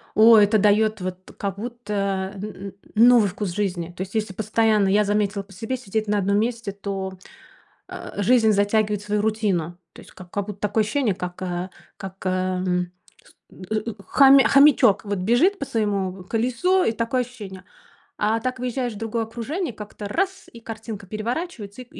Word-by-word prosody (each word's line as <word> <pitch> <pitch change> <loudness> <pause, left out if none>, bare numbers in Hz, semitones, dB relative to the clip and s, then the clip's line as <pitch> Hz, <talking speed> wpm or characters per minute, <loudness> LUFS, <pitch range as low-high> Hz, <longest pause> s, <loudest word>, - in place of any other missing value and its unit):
Ой, 220 -1 +8
это 210 +1 +3
даёт 215 0 +3
вот 185 0 -6
как 200 -1 -3
будто, 205 -4 -3
н 195 - -7
н 200 -2 -7 0.3
новый 235 -4 +6
вкус 200 +1 -4
жизни. 180 -4 -2
То - - -5
есть 190 +2 -5
если 215 -3 -2
постоянно, 215 0 +2
я 210 +1 +3
заметила 205 -1 0
по 195 - -21
себе, 225 +7 -4
сидеть 220 -3 -3
на 210 0 +1
одном 200 +1 +1
месте, 230 -2 -2
то, 195 -1 -5 0.8
э, - - -7
жизнь 225 +1 +4
затягивает 205 0 +1
свою 210 0 -1
рутину. 195 -6 -1 0.2
То - - -12
есть - - -16
как 180 -2 -13
как 200 -1 -3
будто 205 -1 -8
такое 210 +1 +1
ощущение, 235 -3 0
как, 180 -1 -6
э, 180 0 -3 0.3
как, 190 0 -8
эм, 185 -1 -1 0.3
ст - - -22 0.3
э, - - -1
э, 215 +1 -2
хомя 275 -1 +6
хомячок 275 -7 +5
вот 200 -2 -2
бежит 245 - +2
по - - -3
своему 200 -6 -2
колесу, 250 - +1
и 225 - +1
такое 230 +3 0
ощущение. 210 -7 -10 0.5
А 215 +2 +1
так 255 +2 -3
выезжаешь 250 -1 -2
в 205 - -9
другое 225 +1 -2
окружение, 245 - -4
как-то 210 -1 -8
раз, 385 - -2
и 235 - -12
картинка 220 -3 -8
переворачивается, 230 - -5
и - - -16
210 Hz, 175 wpm, -23 LUFS, 195-230 Hz, 0.8 s, Ой